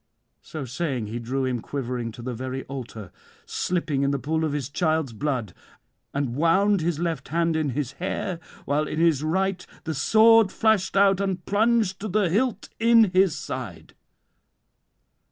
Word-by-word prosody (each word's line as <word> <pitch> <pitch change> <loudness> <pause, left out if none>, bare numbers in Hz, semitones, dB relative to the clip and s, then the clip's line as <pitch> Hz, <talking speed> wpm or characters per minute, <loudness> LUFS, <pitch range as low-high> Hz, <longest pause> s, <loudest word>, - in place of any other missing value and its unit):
So 155 -4 -7
saying, 130 -2 -3
he 110 +3 -5
drew 130 +3 -2
him 125 -2 -1
quivering 125 -3 -4
to 120 - -10
the 125 0 -3
very 130 +2 -5
altar, 120 -7 -8 0.3
slipping 165 -6 -1
in 140 - +2
the 140 - 0
pool 160 +4 -1
of 155 - 0
his 145 -4 -2
child's 155 -3 0
blood, 125 -6 -2 0.6
and 135 -4 -2
wound 190 +6 +3
his 165 -1 0
left 170 0 -2
hand 165 0 0
in 155 -2 0
his 140 -4 -2
hair, 180 +1 -4 0.3
while 150 +2 0
in 155 - -3
his 165 -4 +3
right 185 +4 0 0.2
the 160 - -3
sword 220 +7 +5
flashed 220 -4 +1
out 195 -1 +4
and 190 -3 -2
plunged 215 -2 +2
to 215 - -4
the 195 -3 +1
hilt 220 +1 0
in 230 -3 +5
his 185 -3 +3
side. 115 -10 -7
160 Hz, 165 wpm, -25 LUFS, 135-190 Hz, 0.6 s, sword